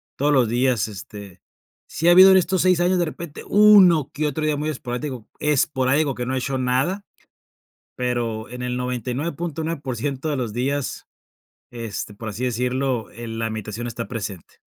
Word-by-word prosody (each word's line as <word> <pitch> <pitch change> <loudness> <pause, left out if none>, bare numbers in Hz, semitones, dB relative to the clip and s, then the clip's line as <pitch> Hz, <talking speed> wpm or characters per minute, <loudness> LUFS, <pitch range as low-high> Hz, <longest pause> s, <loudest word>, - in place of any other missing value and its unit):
todos 145 +2 +1
los 130 -5 +4
días, 120 -2 +1
este, 100 -2 -10 0.5
sí 165 - -2
ha 175 - +8
habido 190 +2 +9
en 190 - +7
estos 185 0 +1
6 185 -2 +3
años 180 +1 +2
de 175 - +2
repente 160 -1 -8
uno 190 -8 +6
que 150 +1 -1
otro 155 +2 -2
día 150 -1 +1
muy 150 +2 -2
esporádico- 125 -3 -5
esporádico 140 -1 +1
que 125 - -4
no 130 +1 -2
he - - 0
hecho 135 +1 -2
nada, 135 +11 0 0.9
pero 120 -3 -2
en 125 0 -7
el 125 0 -2
99.9% 140 +2 -3
de 145 - 0
los 120 -4 -3
días, 135 +4 -3 0.6
este, 115 -3 -6
por 110 +2 -8
así 110 +5 -5
decirlo, 125 -1 -1
eh, 120 +2 -8
la 115 0 -3
meditación 110 +2 -5
está 115 0 -5
presente. 100 -7 -7
130 Hz, 165 wpm, -22 LUFS, 120-155 Hz, 0.9 s, habido